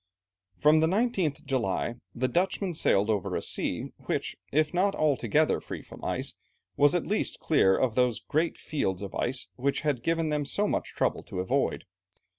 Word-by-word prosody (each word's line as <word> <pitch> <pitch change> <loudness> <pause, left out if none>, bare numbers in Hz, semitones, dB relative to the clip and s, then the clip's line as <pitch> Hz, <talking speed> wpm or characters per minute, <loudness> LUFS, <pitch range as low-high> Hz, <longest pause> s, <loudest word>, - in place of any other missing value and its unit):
From 150 +1 +5
the 160 - +3
19th 190 - 0
July, 115 -4 -1 0.2
the 130 +2 +1
Dutchmen 185 +3 0
sailed 110 -9 +3
over 100 -4 -1
a - - -1
sea, - - -2 0.2
which, - - -1 0.2
if 155 +2 +2
not 195 +3 +2
altogether 150 0 +2
free - - -7
from - - -13
ice, - - -1 0.4
was 145 +3 +4
at 175 - 0
least 210 - -1
clear 95 -12 +3
of 130 -4 +1
those 125 -1 +2
great 160 +3 -1
fields 95 - -2
of 100 - -6
ice 130 +2 -2
which 140 +2 0
had 145 -6 0
given 165 +2 0
them 150 -1 0
so 205 +9 0
much - - -2
trouble - - 0
to - - -7
avoid. 130 +9 0
145 Hz, 175 wpm, -28 LUFS, 125-165 Hz, 0.4 s, From